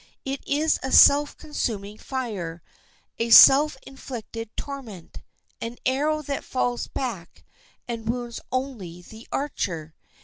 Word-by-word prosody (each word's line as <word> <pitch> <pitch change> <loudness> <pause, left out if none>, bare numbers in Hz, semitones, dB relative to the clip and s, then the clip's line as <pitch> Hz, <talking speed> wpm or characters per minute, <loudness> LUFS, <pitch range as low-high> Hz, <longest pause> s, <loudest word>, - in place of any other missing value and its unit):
It 270 0 -3
is 305 +2 +1
a 265 - -4
self 290 +1 +6
consuming 215 -9 -4
fire, 195 - -5 0.6
a 230 +1 -1
self 270 +5 +8
inflicted 230 -4 -8
torment, 245 - -8 0.4
an 230 +1 -5
arrow 300 +4 +1
that 280 0 -4
falls 245 -1 -2
back 220 -11 -6 0.4
and 230 -2 -5
wounds 240 -1 -3
only 230 -10 -4
the 220 +5 -13
archer. 170 - -3
245 Hz, 115 wpm, -24 LUFS, 215-275 Hz, 0.6 s, self